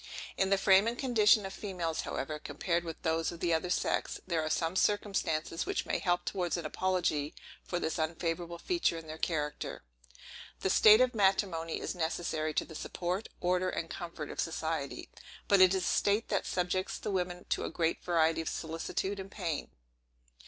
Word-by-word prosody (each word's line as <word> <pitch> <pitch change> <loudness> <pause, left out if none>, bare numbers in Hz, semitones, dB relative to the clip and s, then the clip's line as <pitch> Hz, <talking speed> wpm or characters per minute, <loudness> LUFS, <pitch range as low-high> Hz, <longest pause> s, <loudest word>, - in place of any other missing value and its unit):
In 190 - +1
the 195 - +4
frame 195 +2 +5
and 235 +1 -1
condition 220 -6 +4
of 190 - -5
females, 175 -6 -3
however, 150 +3 -4
compared 170 +4 -1
with 165 -2 -6
those 160 0 +1
of 170 - -9
the 170 -1 +1
other 165 +2 0
sex, - - 0
there 170 -3 0
are 155 - -2
some 165 +2 0
circumstances 190 -6 0
which - - -1
may - - 0
help 175 -2 +1
towards 180 -3 -1
an 170 - -5
apology 165 -4 0 0.3
for 175 - -2
this 160 0 -2
unfavorable 170 +1 -2
feature 340 - 0
in 165 - -8
their 155 0 -8
character. 150 - -2 0.8
The 190 - +1
state 215 +2 +8
of 255 0 +3
matrimony 190 -5 +1
is - - -3
necessary 160 -2 -1
to - - +1
the 160 - -11
support, 180 +5 -3
order, 180 +1 +2
and 165 - -4
comfort 170 -3 -6
of - - -9
society. 160 -3 -3 0.4
But 200 -2 +5
it 185 -1 +8
is 190 - 0
a - - -1
state 205 +5 +2
that - - 0
subjects 185 +1 -1
the - - -4
women 180 -1 -2
to - - 0
a - - -2
great 165 -1 -1
variety 165 -2 +2
of 160 - -3
solicitude 165 +4 -3
and 190 0 -6
pain. 170 -7 -3
175 Hz, 185 wpm, -32 LUFS, 160-190 Hz, 0.8 s, state